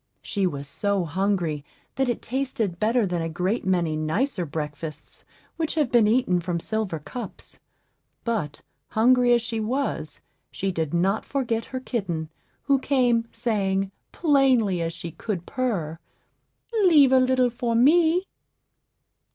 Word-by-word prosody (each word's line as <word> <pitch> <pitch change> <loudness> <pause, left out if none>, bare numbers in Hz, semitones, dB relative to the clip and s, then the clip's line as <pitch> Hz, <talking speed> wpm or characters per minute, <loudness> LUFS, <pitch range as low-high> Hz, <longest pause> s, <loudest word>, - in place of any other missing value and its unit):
She 200 -3 0
was 140 -4 -5
so 200 +4 -1
hungry 170 -3 -1 0.3
that 265 -1 0
it 240 - -2
tasted 235 -8 -2
better 230 +1 +2
than 175 -2 -1
a 165 - -2
great 185 +6 -1
many 175 -4 +1
nicer 175 - -1
breakfasts 150 +1 -6 0.3
which 320 -1 -1
have 295 -6 +1
been 235 -3 +5
eaten 215 -6 +2
from 175 0 -2
silver 215 -2 -2
cups; 215 - -9 0.6
but, 195 -12 -2 0.2
hungry 245 +2 +4
as 240 -1 +4
she 230 -1 -3
was, 255 +6 -3 0.3
she 195 - -2
did 160 -4 -2
not 190 +5 +1
forget 235 -5 -1
her 260 - -5
kitten, 180 -11 -3 0.3
who 275 -1 +3
came, 245 -4 +2
saying, 195 -5 -1 0.2
plainly 260 - +3
as 165 0 -1
she 170 0 -7
could 185 -1 -4
purr, 180 -12 -2 0.9
"Leave 295 -7 +6
a 260 - +6
little 255 -1 +3
for 235 -1 -1
me." 325 +8 +4
220 Hz, 140 wpm, -25 LUFS, 175-255 Hz, 0.9 s, Leave